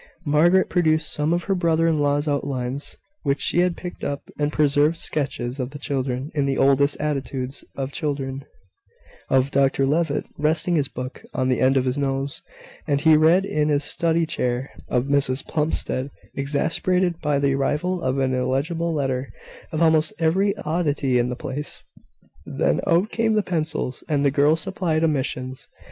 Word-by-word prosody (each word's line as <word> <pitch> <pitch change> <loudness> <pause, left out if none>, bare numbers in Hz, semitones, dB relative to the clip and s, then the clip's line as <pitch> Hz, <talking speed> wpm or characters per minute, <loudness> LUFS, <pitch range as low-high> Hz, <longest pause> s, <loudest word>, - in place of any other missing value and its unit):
Margaret 170 +6 +4
produced 160 -3 +1
some 150 +2 0
of 175 0 +1
her 195 - 0
brother 165 -3 +2
in 160 -2 +2
law's 145 +1 +1
outlines, 140 -1 -3 0.2
which 140 -2 0
she 175 - +1
had 180 -1 +2
picked 180 -1 -8
up 140 0 -4
and 145 0 +1
preserved 150 +2 +2
sketches 135 -5 -2
of 125 -1 -2
the 145 - -9
children, 135 -1 -3
in 145 -3 0
the 135 - 0
oddest 140 +1 +3
attitudes 135 -2 -3
of 135 0 -4
children 140 -3 -3 0.9
of 135 +1 +2
Dr 135 0 +2
Levitt, 150 +1 0
resting 160 +3 +2
his 145 -4 +1
book 130 0 -7
on 130 0 0
the 125 - +1
end 130 +1 +4
of 130 - +2
his 130 +2 -1
nose, 135 0 -2 0.5
as 140 -1 +1
he 160 0 +6
read 165 +5 +4
in 150 -5 0
his 145 -1 +2
study 165 +2 +2
chair 125 -4 -2 0.2
of 125 0 0
Mrs 140 -2 +1
Plumstead, 150 -3 -1 0.2
exasperated 165 +5 0
by 150 -2 +1
the 140 -1 +2
arrival 155 +6 0
of 130 -4 -1
an 130 -1 +1
illegible 140 +7 -1
letter 135 -3 -2 0.4
of 160 +1 +1
almost 160 -1 +3
every 190 +5 +1
oddity 150 -5 +1
in 120 +1 +1
the 125 - -3
place. 140 +4 -3 0.6
Then 70 +2 0
out 175 +6 +2
came 225 -1 +1
the 210 -1 +2
pencils, 155 -7 -2
and 145 -2 +1
the 140 - +4
girls 150 +3 +3
supplied 175 -5 -1
omissions. 130 -4 -2
145 Hz, 170 wpm, -23 LUFS, 135-160 Hz, 0.9 s, he